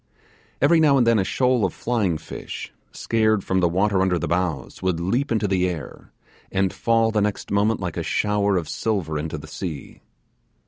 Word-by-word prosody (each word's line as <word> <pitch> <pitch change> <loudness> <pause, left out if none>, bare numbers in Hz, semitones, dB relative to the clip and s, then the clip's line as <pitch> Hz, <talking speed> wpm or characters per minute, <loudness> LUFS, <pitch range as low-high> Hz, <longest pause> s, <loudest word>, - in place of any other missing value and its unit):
Every 160 +3 +5
now 145 -3 +5
and 125 - +4
then 115 -2 +4
a - - +2
shoal 125 +3 +1
of 95 - 0
flying 105 -9 0
fish, 80 - -8 0.2
scared 110 -3 +1
from 95 - 0
the 90 -2 +3
water 95 +2 +1
under 95 -2 +2
the 80 - -2
bows, 85 -6 -2
would 95 -3 0
leap 120 +12 -1
into 110 -2 +1
the 90 -1 +1
air, 80 -5 -8 0.4
and 95 -1 +1
fall 115 -1 +2
the 110 -1 +1
next 105 0 -2
moment 105 +2 +2
like 90 -4 -4
a - - -1
shower 105 -2 +1
of 85 -4 -2
silver 85 -7 -2
into 80 +1 -4
the 70 - -9
sea. 80 -7 -7
95 Hz, 190 wpm, -23 LUFS, 90-110 Hz, 0.4 s, Every